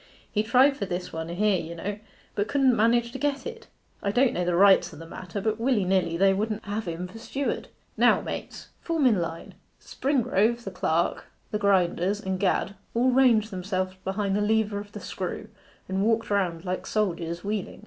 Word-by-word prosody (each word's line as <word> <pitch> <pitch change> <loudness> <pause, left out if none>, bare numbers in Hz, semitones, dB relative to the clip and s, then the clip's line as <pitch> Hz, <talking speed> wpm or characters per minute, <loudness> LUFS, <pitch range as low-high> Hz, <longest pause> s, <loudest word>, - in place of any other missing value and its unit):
He 210 - +1
tried 255 +5 +4
for 200 - -3
this 180 0 -4
one 160 0 -4
here, 195 +2 +1
you 170 +1 -7
know, 200 +5 -4 0.3
but 205 - -1
couldn't 270 -3 +3
manage 235 +2 +3
to 265 - -7
get 280 -1 -1
it. 460 -1 -7 0.3
I 200 - -1
don't 245 +3 +3
know 180 - -1
the 175 0 +1
rights 195 +1 +5
o' - - -11
the 165 - -9
matter, 180 +3 -6
but 220 +1 -1
willy 230 -5 +2
nilly 180 -3 +1
they 195 +1 +4
wouldn't 215 +2 -2
have 205 0 -3
him 170 +2 -4
for 195 +5 -11
steward. 270 +4 -3 0.3
Now - - +5
mates, - - -7
form 330 -4 0
in 220 -7 +4
line.' 165 0 -5 0.3
Springrove, 240 -4 +1
the 195 - -5
clerk, 170 -2 0 0.3
the 210 - -1
grinders, 195 -1 +2
and 190 -2 -3
Gad, 195 0 +1 0.2
all 250 +2 +3
ranged 240 -4 +4
themselves 185 0 -2
behind 195 0 -1
the 205 - +1
lever 210 -1 +1
of 205 0 -9
the - - -6
screw, - - -5 0.4
and 190 +1 -1
walked 225 0 +1
round 180 -4 0
like 185 0 -3
soldiers 175 -5 -1
wheeling. 205 -1 -3
205 Hz, 195 wpm, -26 LUFS, 185-230 Hz, 0.4 s, rights